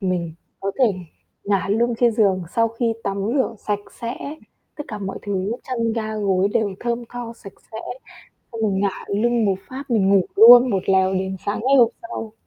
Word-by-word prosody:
mình 180 -4 -2 0.3
có 195 0 -2
thể 260 - +5 0.6
ngả 200 -1 0
lưng 235 +3 +1
trên 240 -2 +4
giường 195 -4 +2
sau 230 0 +3
khi 230 0 -1
tắm 195 0 -2 0.2
rửa 260 -4 0
sạch 205 0 -2 0.2
sẽ, 235 +1 -3 0.6
tất 295 - -6
cả 210 - -5
mọi 195 -1 -5
thứ 200 0 -2
chăn 230 -3 -2
ga 220 -1 -3
gối 195 -2 +1
đều 205 -2 0
thơm 235 0 -2
tho 240 -1 -6
sạch 195 - -12 0.2
sẽ, 220 - -5 0.7
xong 230 - -6
mình 195 -3 +1
ngả 200 -2 -2
lưng 230 +2 +1
một 195 - +2
phát, 265 +2 -6
mình 205 -5 +2
ngủ 195 -1 +5
luôn 240 +4 +9
một 195 -4 0
lèo 190 0 +3
đến 190 0 -2
sáng 205 - -1
ngày 265 +4 +3
hôm 235 -3 +6
sau. 225 -11 -7
215 Hz, 195 wpm, -21 LUFS, 195-235 Hz, 0.7 s, luôn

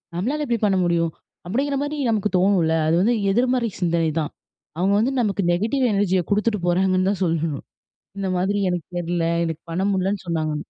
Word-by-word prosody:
நம்ளால 285 +11 -1
எப்டி 235 -2 0
பண்ண 195 -2 +2
முடியும்? 170 -1 +1 0.4
அப்டிங்கிற 275 +8 0
மாரி 295 +1 -3
நமக்கு 210 -2 +1
தோணும்ல? 180 -4 +3
அது 165 - +3
வந்து 230 +5 +3 0.2
எதிர்மறை 245 +1 +1
சிந்தனைதான். 165 -3 0 0.5
அவங்க 190 +3 +2
வந்து 240 +5 +1
நமக்கு 200 -3 0
நெகட்டிவ் 230 +8 0
எனர்ஜிய 190 -2 +2
குடுத்துட்டு 210 0 +1
போறாங்கன்னு 185 +1 +2
தான் 200 -1 -4
சொல்லணும். 160 -3 -1 0.5
இந்த 195 - -2
மாதிரி 200 +3 0
"எனக்கு 175 -3 -3
தெர்ல, 175 -1 -1 0.2
எனக்கு 165 -1 -3
பண்ண 180 +3 -1
முடிலன்னு 190 +1 -1
சொன்னாங்க" 155 -2 -1
190 Hz, 165 wpm, -22 LUFS, 170-215 Hz, 0.5 s, தோணும்ல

